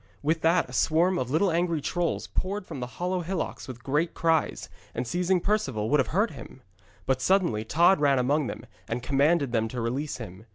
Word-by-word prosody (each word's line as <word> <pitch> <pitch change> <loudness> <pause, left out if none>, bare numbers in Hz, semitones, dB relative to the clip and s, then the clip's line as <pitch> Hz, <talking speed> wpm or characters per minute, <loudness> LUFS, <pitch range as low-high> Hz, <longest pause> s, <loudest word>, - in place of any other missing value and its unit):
With 160 +2 +1
that 165 +2 +3
a 125 - -12
swarm 170 +7 +2
of 125 - -2
little 170 +7 +2
angry 170 -1 +1
trolls 175 +3 -1
poured 195 +1 -3
from 140 - -7
the 125 - -4
hollow 180 +1 -1
hillocks 180 +1 -4
with 120 -2 -9
great 150 +5 0
cries, 165 -1 +1 0.3
and 125 - -2
seizing 180 +7 +1
Perceval 135 - -1
would 150 - +4
have 130 - +2
hurt 205 +7 +1
him. 130 -2 -11 0.4
But 130 -1 0
suddenly 170 - +2
Tod 170 +9 +4
ran 140 -2 +3
among 140 +3 +1
them, - - -7 0.2
and 120 +2 -3
commanded 140 +1 +2
them 110 -2 +1
to 120 +2 -5
release 130 +6 -2
him. 110 -2 -10
150 Hz, 200 wpm, -27 LUFS, 125-175 Hz, 0.4 s, would